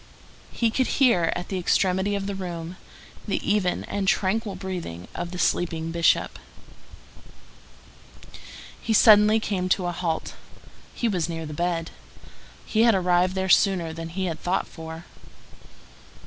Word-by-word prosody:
He 230 -2 0
could 260 +2 +1
hear, 235 -12 +4
at 180 - -5
the 190 - -2
extremity 190 +3 +1
of 200 -1 -3
the 200 - -3
room, 175 -2 -6 0.5
the - - 0
even 205 -3 +1
and 200 -1 -3
tranquil 200 +2 0
breathing 180 - -6
of 175 - -5
the 180 - -7
sleeping 165 -2 0
Bishop. 170 0 +1 2.4
He 225 - -1
suddenly 215 0 +6
came 185 -4 -2
to 185 0 +1
a 175 - -1
halt. 170 -2 -3 0.6
He 240 - 0
was 180 -6 -1
near 165 -1 -4
the 155 - -7
bed. 170 +1 -2 0.7
He 220 - +1
had 230 -2 +5
arrived 180 0 +2
there 190 0 -1
sooner 185 -4 +3
than 165 0 -6
he 185 +3 -3
had 165 -3 -3
thought 180 +2 0
for. 160 +1 -9
180 Hz, 145 wpm, -25 LUFS, 170-200 Hz, 2.4 s, suddenly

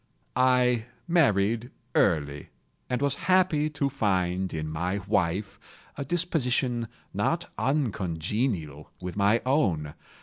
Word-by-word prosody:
I 125 -2 +3 0.2
married 115 - +2 0.2
early, 70 -2 +1 0.4
and 125 +2 0
was 140 -1 +2 0.2
happy 175 -5 +4
to 145 -2 -1
find 95 -7 0
in 80 -1 -3
my 85 +5 -2
wife 95 -1 0 0.4
a 140 - -3
disposition 130 -7 0 0.3
not - - -1
uncongenial 95 - -1
with 90 -1 -6
my 105 +3 +3
own. 90 - +1
110 Hz, 105 wpm, -27 LUFS, 90-135 Hz, 0.4 s, happy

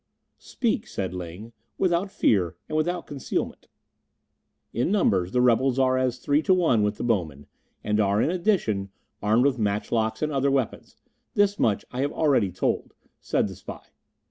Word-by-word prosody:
"Speak," 235 -2 -2
said 95 - -4
Ling, 90 +6 -8 0.2
"without 185 +1 +1
fear 95 - +1
and 155 - -4
without 170 +3 0
concealment." 140 -3 -4 1.1
"In 125 +10 0
numbers 95 - +2
the 125 - +2
rebels 125 +2 +3
are 130 -1 +3
as 130 -1 0
three 145 +4 +1
to 185 +2 +3
one 160 -12 +3
with 105 0 +1
the - - -4
bowmen, 85 - -1 0.4
and 105 0 0
are, 100 0 +2
in 155 - +2
addition, 170 - 0 0.3
armed 110 +5 +3
with 135 -3 +1
matchlocks 110 +4 -1
and 155 - 0
other 140 -1 +1
weapons; 135 -4 -2 0.4
this 205 0 +2
much 105 -3 +1
I 125 - -3
have 145 +1 0
already 135 - +2
told," 90 - -2 0.2
said - - 0
the - - -7
spy. - - -10
125 Hz, 165 wpm, -25 LUFS, 105-155 Hz, 1.1 s, rebels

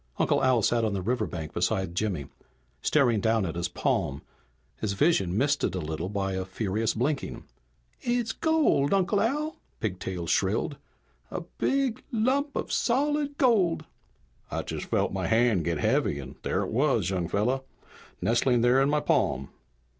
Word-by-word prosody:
Uncle - - +2
Al 130 -4 +3
sat 120 +2 +2
on 110 -2 0
the 95 - -2
riverbank 100 -9 -2
beside 95 -3 0
Jimmy, 90 -6 -1 0.6
staring 125 - +3
down 110 -1 +2
at 80 - -3
his 85 +1 -2
palm, 70 +1 -1 0.5
his 105 -2 -2
vision 100 - +2
misted 145 -5 +1
a - - -1
little 80 +2 -4
by 95 -1 -2
a 95 0 -2
furious 105 +3 -1
blinking. 135 +5 -2 0.6
"It's 240 -2 0
gold, 300 - +2
Uncle 195 +1 +2
Al!" 300 +7 -1 0.2
Pigtail 90 -4 -3
shrilled. - - 0 0.5
"A - - -4
big 265 +7 -1
lump 270 +6 +1
of - - -3
solid 290 +3 +1
gold 190 - +3 0.3
" - - -37
"I - - -3
just - - -5
felt - - 0
my - - -1
hand 115 -6 +3
get 85 -2 0
heavy 75 - +1
and 65 -2 -7
there - - 0
it - - -4
was, 115 - +2
young 90 -3 -1
fella, 115 +9 0 0.6
nestling 120 +1 +3
there 125 +3 +4
in 135 - +3
my 150 0 +2
palm!" 65 - +1
115 Hz, 160 wpm, -27 LUFS, -, 0.6 s, there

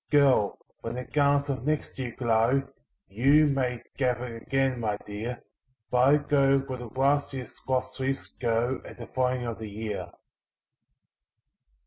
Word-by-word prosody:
Girl! 135 -8 +4 0.2
when 115 +1 -5
the 125 - -3
garlands 140 0 +2
of 130 -4 -2
next 150 -1 -2
year 125 -3 -4
glow, 120 +2 +3 0.4
YOU 135 +9 +4
may 125 -4 0
gather 125 -2 -1
again, 135 +2 0
my 105 -3 -1
dear 110 +4 -5 0.5
But 125 +1 +4
I 145 +2 +6
go 140 -2 +3
where 135 -2 -4
the 120 - -7
last 140 +1 +2
year's 125 -4 -7
lost 130 0 -1
leaves 135 +1 -1
go 120 +3 -1
At - - -11
the 120 - -7
falling 125 0 0
of 115 -2 -4
the 110 -1 -6
year." 105 0 -5
130 Hz, 150 wpm, -28 LUFS, 115-135 Hz, 0.5 s, I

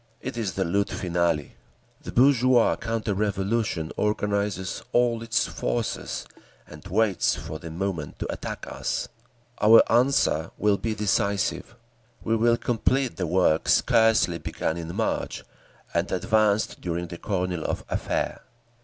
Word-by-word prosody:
It - - -6
is 110 -6 -2
the 95 - +1
lutte 100 +3 0
finale. 85 -5 -1 0.5
The - - -7
bourgeois 130 -2 +4
counter 115 -2 -2
revolution 100 -3 -1
organises 100 -3 -1
all 120 -1 +2
its 115 0 +1
forces - - -3 0.4
and - - -13
waits 110 -4 +2
for 80 -1 -7
the 85 - -8
moment 85 -3 -4
to - - -4
attack - - -6
us. - - -3 0.5
Our 110 +2 +8
answer 120 - +3
will 105 -1 +2
be 110 -1 -2
decisive. 100 +2 0 0.5
We 115 - +1
will 115 +1 +3
complete 125 +2 0
the 90 - -1
work 85 -2 +2
scarcely 110 -6 +3
begun 80 - -3
in 85 0 -6
March, - - -2 0.5
and - - 0
advanced 105 +3 +1
during 85 0 -2
the 85 0 -9
Kornilov 90 -4 -2
affair…." - - -2
100 Hz, 130 wpm, -25 LUFS, 85-115 Hz, 0.5 s, Our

